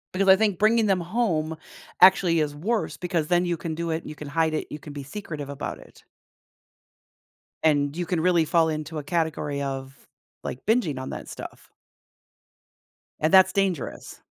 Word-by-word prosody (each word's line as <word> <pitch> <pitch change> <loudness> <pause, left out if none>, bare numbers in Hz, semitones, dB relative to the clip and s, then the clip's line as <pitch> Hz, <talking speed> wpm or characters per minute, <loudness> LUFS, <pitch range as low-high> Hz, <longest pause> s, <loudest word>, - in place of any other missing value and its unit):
Because 195 0 +2
I 190 - +8
think 205 -4 +1
bringing 220 +2 +3
them 195 -3 +2
home 165 -5 -1 0.4
actually 180 -3 +6
is 145 -1 -1
worse 215 +9 -1
because 170 -4 -2
then 175 +1 +3
you 175 -1 -1
can 160 -1 -4
do 170 +1 -3
it 160 +1 -2
and - - -9
you 155 - -8
can 150 -1 -8
hide 160 +1 +1
it, - - -2
you 150 - -7
can 150 0 -10
be 145 -1 -6
secretive 150 -3 -7
about 140 - -5
it. - - -18 1.6
And 145 -2 +2
you 175 +1 -2
can 175 -1 -1
really 175 -1 +3
fall 160 +1 +3
into 155 +1 -4
a 150 - -4
category 150 -3 -1
of, 135 -1 -5 0.5
like, 125 - -6
binging 200 - +1
on 130 - -6
that - - -7
stuff. - - -10 1.5
And 155 +1 +1
that's 190 0 +7
dangerous. 190 -8 -2
165 Hz, 180 wpm, -25 LUFS, 150-185 Hz, 1.6 s, I